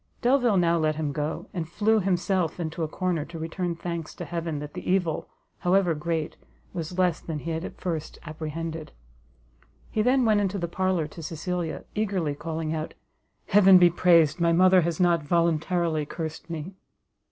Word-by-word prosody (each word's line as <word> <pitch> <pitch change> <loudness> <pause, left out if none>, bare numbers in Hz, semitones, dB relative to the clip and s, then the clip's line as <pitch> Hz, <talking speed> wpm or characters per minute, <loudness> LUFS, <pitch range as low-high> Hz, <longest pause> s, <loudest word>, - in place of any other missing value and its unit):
Delvile 245 -4 +3
now 170 -1 +3
let 155 -1 +1
him 155 -2 -2
go, 150 +2 -3
and 170 -4 -4
flew 220 +4 +2
himself 180 -3 0
into 165 0 -4
a 160 - 0
corner 175 -1 -1
to 165 +1 -9
return 170 +2 -3
thanks 170 -1 -5
to - - -6
heaven 165 -2 -3
that 150 0 -7
the - - -6
evil, 180 -4 0 0.3
however 180 -1 +3
great, 160 0 -3 0.4
was 175 0 -5
less 180 -3 +2
than 160 -2 -5
he 165 +3 -4
had 160 +1 -3
at - - -8
first 165 -4 -4
apprehended. 160 0 -5 1.0
He 215 - +1
then 250 +2 +3
went 215 -2 +4
into 200 0 -1
the 175 -2 -2
parlour 185 -1 0
to 165 - -10
Cecilia, 165 +1 -4
eagerly 195 -8 -1
calling 160 +1 -4
out, 155 0 -4 0.5
"Heaven 195 -2 +7
be 175 -1 +6
praised, 170 -2 +4
my 170 0 +3
mother 185 +2 +6
has 170 -1 -2
not 175 -2 +3
voluntarily 165 0 +1
cursed 160 +1 -6
me!" 165 +3 -5
170 Hz, 175 wpm, -26 LUFS, 160-185 Hz, 1.0 s, Heaven